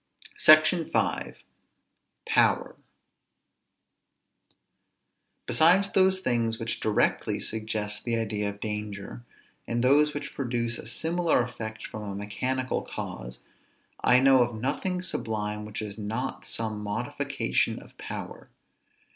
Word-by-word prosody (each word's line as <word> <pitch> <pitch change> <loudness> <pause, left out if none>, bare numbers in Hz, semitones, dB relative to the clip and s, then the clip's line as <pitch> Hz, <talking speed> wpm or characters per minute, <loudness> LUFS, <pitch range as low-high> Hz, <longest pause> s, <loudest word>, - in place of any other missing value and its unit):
SECTION 155 +2 +6
V. - - 0 0.9
POWER. - - +2 2.7
Besides 185 +5 +4
those 190 0 +4
things 115 -7 0
which 115 0 -3
directly 110 -1 +1
suggest 110 -1 -3
the 120 -1 0
idea 105 -2 -1
of 100 0 -9
danger, 105 - -5 0.4
and 120 +1 -1
those 150 +3 +4
which 145 0 -5
produce 120 -3 -1
a - - -8
similar 165 -5 +1
effect 110 -2 -6
from 110 - -7
a 100 -2 -5
mechanical 130 +6 -2
cause, 60 +1 -6 0.7
I 125 - +6
know 135 -1 +6
of 120 -1 0
nothing 180 +9 -1
sublime, 105 - -2
which 105 0 -5
is 105 0 -6
not 110 +5 -4
some 110 -2 -1
modification 105 0 -1
of - - -13
power. - - -7
115 Hz, 115 wpm, -27 LUFS, 105-135 Hz, 2.7 s, SECTION